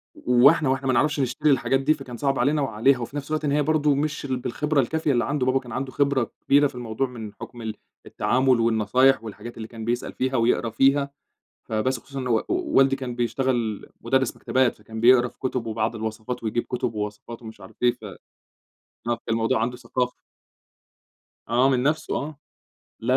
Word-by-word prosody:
و 125 - -4
وإحنا 150 -2 +6
وإحنا 135 0 0
ما 130 - +2
نعرَفش 150 +4 +2
نشتري 140 +4 +1
الحاجات 135 0 +2
دي، 145 +3 +3
فكان 130 -5 -9
صعب 135 -2 0
علينا 145 +4 +2
وعليها، 125 +1 +2
وفي 120 +4 -6
نفْس 140 +1 -6
الوقت 155 -1 -1
إن 140 - +1
هي 150 +1 +2
برضه 150 -1 +2
مش 150 0 -2
ال 130 -2 -1
بالخِبرة 150 +4 -1
الكافية 155 +4 0
اللي 120 -3 +1
عَند 145 -2 -1
بابا، 130 +1 +2
كان 120 -3 -12
عَنده 130 +1 -3
خِبرة 140 -3 +1
كبيرة 145 +1 +5
في 130 - -13
الموضوع 120 +2 -2
من 110 -4 -8
حُكم 120 +2 -10
ال 110 -1 -4 0.3
التعامل 130 -1 +2
والنصايح 115 +3 +3
والحاجات 115 +2 -9
اللي 110 0 -6
كان 110 -1 -8
بيسأل 120 +1 -2
فيها 130 +1 -1
ويقرا 115 0 +2
فيها، 140 +4 +2 0.6
فبس، 115 +3 0
خصوصًا 140 +2 -8
إن 130 - -3
و 115 -2 +2
والدي 135 - +3
كان 130 -3 -5
بيشتغل 120 -2 -1 0.2
مُدرِّس 130 +1 +1
مَكتبات، 130 -2 +1
فكان 110 +1 -9
بيقرأ 125 0 +6
في - - -16
كُتُب 125 -2 -2
وبعض 110 +1 -1
الوصفات 110 +2 -5
ويجيب 115 +2 -1
كُتُب 125 -2 -2
ووصفات 105 +3 -6
ومش 110 -1 -11
عارف - - -13
إيه، 120 - +6
ف 120 -2 -17
آه، 100 -3 -8 0.9
كان 120 0 0
الموضوع 115 0 +1
عَنده 125 +1 -2
ثقافة. 125 +1 -2 1.4
آه 125 +3 +4
من 125 -1 +1
نفْسه 155 +2 0
آه، 150 0 -4 0.6
لا، 125 +3 0
125 Hz, 195 wpm, -24 LUFS, 115-135 Hz, 1.4 s, وإحنا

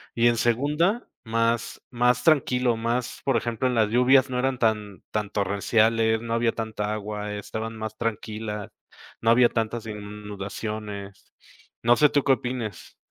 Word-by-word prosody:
Y 120 0 +4
en 120 -1 +3
segunda, 150 - +1 0.2
más 115 +1 0
más 125 0 +2
tranquilo, 125 -6 +3
más, 120 +2 -2
por 135 - +2
ejemplo, 120 +2 0
en 125 - 0
las 110 -2 +3
lluvias 130 +3 +4
no 125 -1 -1
eran 130 0 0
tan 105 -3 -1
tan 105 -1 -2
torrenciales, 110 +3 +2
no 115 -1 -3
había 115 0 +2
tanta 110 -2 -3
agua, 105 0 -4
estaban 110 +2 -5
más 110 0 -6
tranquila, 110 -2 -4 0.5
no 115 - +1
había 120 0 +6
tantas 115 0 -2
inundaciones. 105 -1 -7 0.5
No 120 +1 +5
sé 150 - +6
tú, 145 -1 +2
¿qué 140 - +3
opines? 125 -3 -5
115 Hz, 150 wpm, -25 LUFS, 105-125 Hz, 0.5 s, había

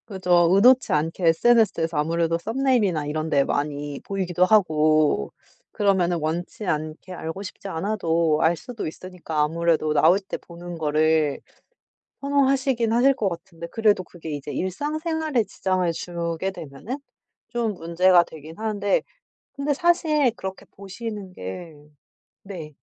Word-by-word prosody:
그죠. 180 -4 +3
의도치 245 +7 +5
않게 165 +3 0
SNS에서 170 -4 +3
아무래도 165 +2 +1
썸네일이나 225 - +1
이런 155 +2 -3
데 140 -3 +3
많이 145 0 -3
보이기도 185 -2 0
하고 155 - +3 0.4
그러면은 190 -4 +2
원치 170 +6 -4
않게 155 +2 -3
알고 170 +3 -6
싶지 200 0 -8
않아도 165 -4 0
알 165 +1 +3
수도 235 -1 -6
있으니까 165 -2 -4
아무래도 160 0 +1
나오실 180 +6 +3
때 - - -4
보는 175 0 -10
거를 155 -1 +1 0.8
선호하시긴 270 -4 +1
하실 255 +4 +4
것 210 -6 0
같은데 170 -1 -8
그래도 210 -3 +2
그게 165 -2 -10
이제 145 -1 -5
일상생활에 305 - -1
지장을 185 -2 -1
주게 170 +1 -3
되면은 175 - -7 0.5
좀 230 -2 -1
문제가 175 +1 +4
되긴 160 0 -12
하는데 205 -2 0 0.5
근데 285 +1 -1
사실 310 -4 +2
그렇게 190 -2 -7
보시는 200 0 -7
게 160 - -7 0.7
네. 170 -6 -8
180 Hz, 310 characters per minute, -24 LUFS, 160-215 Hz, 0.8 s, 의도치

